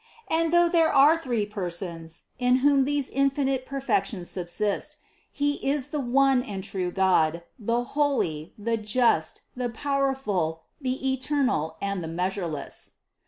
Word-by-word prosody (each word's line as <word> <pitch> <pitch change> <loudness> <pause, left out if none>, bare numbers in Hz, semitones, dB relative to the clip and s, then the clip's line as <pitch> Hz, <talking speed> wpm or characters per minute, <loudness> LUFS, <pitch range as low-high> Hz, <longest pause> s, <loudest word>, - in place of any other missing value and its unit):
And 325 0 +2
though 345 0 +5
there 335 -2 +3
are 285 +4 +6
three 245 -10 -1
Persons, 170 -4 -4 0.2
in 250 0 +4
whom 280 -2 +5
these 285 -1 0
infinite 275 -1 0
perfections 260 -8 -1
subsist, 190 +3 -2 0.3
He 290 0 -1
is 280 0 0
the 300 - -2
one 270 0 +3
and 200 -6 -6
true 190 -3 -2
God, 170 -3 +2 0.2
the 235 +2 0
Holy, 245 - 0
the 230 +2 -1
Just, 215 -6 +1
the 250 -1 -2
Power 275 +3 0
ful, 175 -10 -2 0.2
the 265 0 -1
Eternal 265 - 0
and 200 -3 -2
the - - -4
Measureless. 175 -2 -3
245 Hz, 140 wpm, -26 LUFS, 185-275 Hz, 0.3 s, are